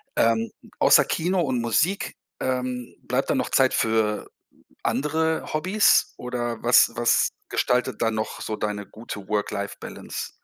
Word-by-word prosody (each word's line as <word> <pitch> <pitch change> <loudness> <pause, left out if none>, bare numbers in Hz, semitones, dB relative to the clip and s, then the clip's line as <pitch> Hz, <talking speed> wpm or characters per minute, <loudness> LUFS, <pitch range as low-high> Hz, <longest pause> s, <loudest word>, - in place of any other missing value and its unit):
Ähm, 115 0 +2 0.3
außer - - +6
Kino 180 +3 0
und 130 -6 0
Musik, 155 - 0 0.2
ähm, 125 -1 -3
bleibt - - -1
da - - +2
noch - - -1
Zeit - - +4
für 110 -1 +1 0.6
andere 160 +3 0
Hobbys 185 +7 +3
oder 120 -2 -4
was 120 -1 +5
was 120 0 +3 0.2
gestaltet 125 -2 0
da 115 - +3
noch 110 0 -4
so 110 - -3
deine 105 -1 -3
gute 105 -3 -9
Work-Life-Balance? 100 -1 -4
120 Hz, 130 wpm, -24 LUFS, 110-145 Hz, 0.6 s, außer